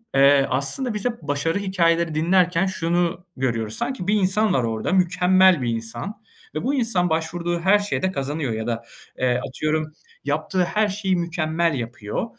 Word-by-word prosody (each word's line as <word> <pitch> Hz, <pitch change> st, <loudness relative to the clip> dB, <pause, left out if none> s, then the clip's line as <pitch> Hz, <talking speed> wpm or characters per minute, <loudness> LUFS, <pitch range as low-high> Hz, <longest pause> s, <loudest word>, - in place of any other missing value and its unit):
eee, 140 Hz, 0 st, +6 dB
aslında 140 Hz, -, 0 dB
biz 210 Hz, +1 st, -4 dB
hep 235 Hz, -5 st, -2 dB
başarı 150 Hz, +5 st, -1 dB
hikâyeleri 170 Hz, -4 st, +1 dB
dinlerken 175 Hz, +2 st, +3 dB
şunu 175 Hz, -1 st, -1 dB
görüyoruz. 115 Hz, -4 st, -1 dB
Sanki 260 Hz, -9 st, -3 dB
bir 205 Hz, -, +3 dB
insan 205 Hz, +1 st, +2 dB
var 130 Hz, -, +2 dB
orada, 115 Hz, +6 st, -2 dB
mükemmel 185 Hz, -2 st, +4 dB
bir 120 Hz, -, -1 dB
insan 115 Hz, -, -5 dB, 0.3 s
ve 155 Hz, -, -2 dB
bu 270 Hz, -, 0 dB
insan 225 Hz, -9 st, +1 dB
başvurduğu 170 Hz, +2 st, -1 dB
her 195 Hz, +4 st, +4 dB
şeyde 200 Hz, -2 st, -1 dB
kazanıyor 140 Hz, -4 st, -2 dB
ya 110 Hz, +1 st, -4 dB
da, 115 Hz, -1 st, -2 dB, 0.4 s
eee, 125 Hz, -1 st, +1 dB
atıyorum, 155 Hz, +3 st, -2 dB, 0.3 s
yaptığı 185 Hz, -2 st, 0 dB
her 215 Hz, +4 st, +1 dB
şeyi 195 Hz, -1 st, -1 dB
mükemmel 170 Hz, -1 st, 0 dB
yapıyor, 115 Hz, -, -4 dB
170 Hz, 160 wpm, -23 LUFS, 140-190 Hz, 0.4 s, eee